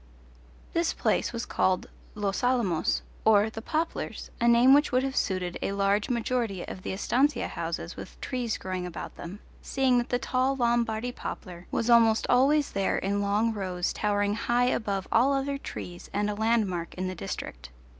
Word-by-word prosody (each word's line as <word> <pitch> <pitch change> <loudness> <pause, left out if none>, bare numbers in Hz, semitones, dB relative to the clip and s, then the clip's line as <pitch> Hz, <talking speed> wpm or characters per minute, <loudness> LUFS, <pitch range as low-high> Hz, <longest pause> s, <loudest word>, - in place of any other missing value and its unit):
This 335 0 +1
place - - +1
was 235 0 -4
called 185 -1 +1 0.3
Los 205 +1 -1
Alamos, 180 - +1 0.2
or 220 0 +4
The 225 - -6
Poplars, 320 +7 -3
a 235 - +3
name 240 +3 +7
which 290 +1 +4
would 255 +1 +2
have 270 0 -2
suited 185 -3 -1
a 195 - -1
large 200 +1 +1
majority 235 -5 -1
of 185 - -7
the - - -4
estancia 255 +9 +1
houses - - -4
with - - -10
trees 245 -4 -2
growing 185 -1 -4
about 170 - -7
them, 185 +5 -8 0.2
seeing 260 -2 +2
that 240 - -3
the 245 - +2
tall 260 +1 0
Lombardy 235 -1 +1
poplar 180 -7 -7
was 230 - -1
almost 230 -2 +5
always 280 +4 +4
there 195 -1 0
in 200 +1 -1
long 210 +3 +1
rows 185 -3 -2
towering 205 -1 +1
high 240 +3 +1
above 200 -6 -1
all 255 +5 +4
other 275 0 -1
trees 175 -9 -8
and 205 +1 0
a - - -2
landmark 205 -6 0
in 185 +1 -2
the 185 - -3
district. 95 - -6
220 Hz, 175 wpm, -28 LUFS, 195-245 Hz, 0.3 s, name